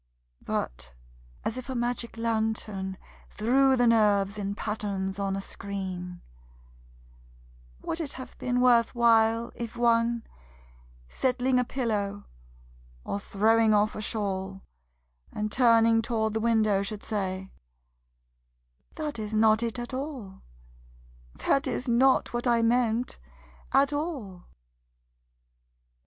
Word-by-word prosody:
But 65 Hz, 0 st, -4 dB, 0.5 s
as 225 Hz, -, -2 dB
if 255 Hz, -, -10 dB
a 260 Hz, -, -3 dB
magic 240 Hz, -1 st, -2 dB
lantern 220 Hz, -4 st, -2 dB, 0.3 s
threw 265 Hz, +5 st, +3 dB
the 245 Hz, -, +3 dB
nerves 210 Hz, -3 st, +3 dB
in 200 Hz, 0 st, -3 dB
patterns 200 Hz, -3 st, -3 dB
on 195 Hz, -1 st, -1 dB
a 195 Hz, -, -3 dB
screen: 185 Hz, -3 st, -6 dB, 1.6 s
Would 325 Hz, -, -3 dB
it 290 Hz, -3 st, -4 dB
have 260 Hz, -, -9 dB
been 250 Hz, 0 st, 0 dB
worth 240 Hz, -1 st, +4 dB
while 230 Hz, 0 st, +3 dB
If 235 Hz, 0 st, -6 dB
one, 235 Hz, 0 st, +2 dB, 0.8 s
settling 255 Hz, -, +1 dB
a -, -, +2 dB
pillow 210 Hz, -6 st, -2 dB, 0.8 s
or 200 Hz, -, -3 dB
throwing 220 Hz, +2 st, +3 dB
off 210 Hz, +1 st, +2 dB
a -, -, -4 dB
shawl, 195 Hz, -3 st, -3 dB, 0.7 s
And 210 Hz, 0 st, -3 dB
turning 230 Hz, -2 st, +4 dB
toward 220 Hz, -2 st, -1 dB
the 220 Hz, -, 0 dB
window, 215 Hz, -3 st, +2 dB
should 205 Hz, +1 st, -5 dB
say: 190 Hz, -3 st, -3 dB, 1.4 s
"That 300 Hz, -6 st, -4 dB
is 215 Hz, 0 st, -4 dB
not 220 Hz, 0 st, +4 dB
it 235 Hz, 0 st, -2 dB
at 240 Hz, +2 st, -6 dB
all, 260 Hz, -8 st, -6 dB, 0.9 s
That 275 Hz, -, +1 dB
is 250 Hz, -, -3 dB
not 255 Hz, +2 st, +3 dB
what 240 Hz, +1 st, -2 dB
I 235 Hz, -1 st, +3 dB
meant, 240 Hz, 0 st, +1 dB, 0.5 s
at 275 Hz, +2 st, +3 dB
all." 270 Hz, -, -4 dB
225 Hz, 115 wpm, -27 LUFS, 200-240 Hz, 1.6 s, worth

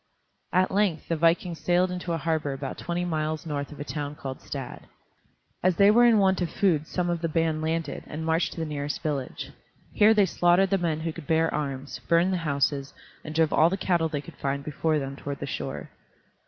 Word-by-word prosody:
At 185 Hz, +1 st, +2 dB
length 195 Hz, -6 st, 0 dB
the 165 Hz, -, +1 dB
vikings 165 Hz, +1 st, +1 dB
sailed 175 Hz, +3 st, +2 dB
into 180 Hz, -1 st, -4 dB
a -, -, 0 dB
harbor 160 Hz, -3 st, -1 dB
about 135 Hz, 0 st, -6 dB
twenty 175 Hz, +1 st, -2 dB
miles 155 Hz, -2 st, -2 dB
north 145 Hz, -2 st, -3 dB
of 150 Hz, -, -11 dB
a -, -, -3 dB
town 145 Hz, -1 st, -4 dB
called 135 Hz, -2 st, -7 dB
Stad. -, -, -7 dB, 0.7 s
As 185 Hz, -1 st, +3 dB
they 200 Hz, +4 st, +6 dB
were 240 Hz, +3 st, +6 dB
in 230 Hz, -2 st, +5 dB
want 190 Hz, -2 st, +3 dB
of 175 Hz, -, 0 dB
food 160 Hz, -6 st, +1 dB
some 180 Hz, -1 st, -1 dB
of 170 Hz, -1 st, -1 dB
the 165 Hz, -, -1 dB
band 160 Hz, -1 st, 0 dB
landed, 160 Hz, +1 st, -2 dB
and 160 Hz, +2 st, -5 dB
marched 165 Hz, +1 st, +1 dB
to -, -, -8 dB
the 160 Hz, -, -1 dB
nearest 145 Hz, -1 st, -4 dB
village. 140 Hz, -4 st, -3 dB, 0.4 s
Here 215 Hz, +2 st, +5 dB
they 205 Hz, -2 st, +5 dB
slaughtered 175 Hz, +2 st, +3 dB
the 195 Hz, -, +3 dB
men 160 Hz, -3 st, -1 dB
who 165 Hz, 0 st, -3 dB
could 160 Hz, -4 st, -10 dB
bear 160 Hz, 0 st, +2 dB
arms, 140 Hz, -2 st, -4 dB
burned 170 Hz, +3 st, +3 dB
the -, -, +1 dB
houses, 140 Hz, -3 st, -1 dB, 0.3 s
and 155 Hz, 0 st, -7 dB
drove 160 Hz, -1 st, +3 dB
all 165 Hz, -, +5 dB
the 195 Hz, -, -2 dB
cattle 170 Hz, -4 st, +1 dB
they 145 Hz, -2 st, -3 dB
could -, -, -13 dB
find 140 Hz, 0 st, -2 dB
before 155 Hz, +2 st, 0 dB
them 135 Hz, -1 st, -4 dB
toward 140 Hz, 0 st, -5 dB
the -, -, -4 dB
shore. -, -, -5 dB
160 Hz, 220 wpm, -26 LUFS, 150-175 Hz, 0.7 s, they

